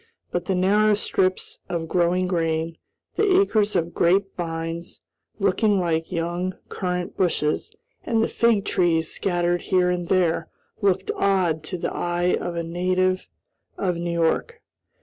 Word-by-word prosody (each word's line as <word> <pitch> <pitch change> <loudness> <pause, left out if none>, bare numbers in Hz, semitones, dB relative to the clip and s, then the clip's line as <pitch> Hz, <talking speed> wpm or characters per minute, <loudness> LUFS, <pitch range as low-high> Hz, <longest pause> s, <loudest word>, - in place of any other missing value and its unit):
But 175 0 -2
the 190 - 0
narrow 205 +3 +4
strips 185 -2 -1
of 170 -2 -2
growing 180 +2 +2
grain, 165 -2 -1 0.4
the 390 -3 +4
acres 215 - +2
of 170 -1 0
grape 195 +3 +2
vines, 165 0 -4 0.4
looking 200 0 +2
like 165 -2 -1
young 175 +2 -2
currant 180 -1 -3
bushes, 175 - 0 0.3
and 225 -1 +1
the - - +2
fig 225 -4 +2
trees 165 -2 +1
scattered 175 -2 0
here 180 -2 +2
and 175 -1 -2
there, 180 -3 +1 0.3
looked 190 -1 +1
odd 185 -5 +1
to 180 +3 -4
the - - -3
eye 175 +1 0
of 175 -1 -4
a 170 - -2
native 185 +2 0 0.5
of 180 -3 0
New 170 +1 -3
York. 170 - 0
180 Hz, 145 wpm, -24 LUFS, 170-190 Hz, 0.5 s, narrow